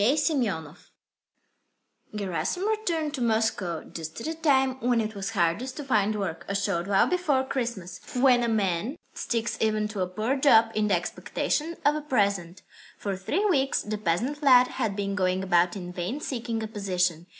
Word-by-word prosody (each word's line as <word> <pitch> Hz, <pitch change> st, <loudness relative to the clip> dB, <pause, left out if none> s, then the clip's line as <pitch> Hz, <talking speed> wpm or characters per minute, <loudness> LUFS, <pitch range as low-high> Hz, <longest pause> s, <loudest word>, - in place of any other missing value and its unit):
SEMYONOV 220 Hz, -, 0 dB, 1.2 s
I 215 Hz, -, -7 dB
Gerasim 205 Hz, -, -2 dB
returned 340 Hz, -9 st, -1 dB
to 270 Hz, -, -4 dB
Moscow 220 Hz, -7 st, 0 dB
just 160 Hz, +2 st, -8 dB
at -, -, -6 dB
a 320 Hz, -, -2 dB
time 270 Hz, -5 st, +2 dB
when 245 Hz, -1 st, +2 dB
it 220 Hz, -1 st, -2 dB
was 200 Hz, -1 st, -4 dB
hardest 220 Hz, +6 st, 0 dB
to 295 Hz, -, -4 dB
find 215 Hz, -5 st, +1 dB
work, 175 Hz, -5 st, -3 dB
a 200 Hz, -, -2 dB
short 185 Hz, -3 st, -1 dB
while 195 Hz, -1 st, +4 dB
before 315 Hz, -7 st, +1 dB
Christmas, 235 Hz, -9 st, -4 dB, 0.2 s
when 250 Hz, -1 st, +5 dB
a 235 Hz, -, +1 dB
man 210 Hz, -, 0 dB, 0.2 s
sticks 230 Hz, -1 st, -2 dB
even 215 Hz, -1 st, +1 dB
to 210 Hz, -2 st, -6 dB
a 180 Hz, -, +1 dB
poor 215 Hz, +8 st, -1 dB
job 230 Hz, -5 st, +5 dB
in 215 Hz, -1 st, +1 dB
the 200 Hz, -, +3 dB
expectation 305 Hz, -, -2 dB
of 290 Hz, -, +5 dB
a 305 Hz, -, -3 dB
present. 200 Hz, -, 0 dB, 0.3 s
For 200 Hz, -2 st, -3 dB
three 295 Hz, -, -1 dB
weeks 275 Hz, -9 st, +2 dB
the 210 Hz, 0 st, -4 dB
peasant 225 Hz, -, -1 dB
lad 255 Hz, -3 st, +6 dB
had 205 Hz, -3 st, -2 dB
been 200 Hz, -1 st, -2 dB
going 185 Hz, -1 st, 0 dB
about 175 Hz, -1 st, +3 dB
in 180 Hz, -2 st, -6 dB
vain 180 Hz, +11 st, -3 dB
seeking 235 Hz, -5 st, -3 dB
a -, -, -3 dB
position. 180 Hz, -5 st, -1 dB
220 Hz, 180 wpm, -27 LUFS, 190-265 Hz, 1.2 s, lad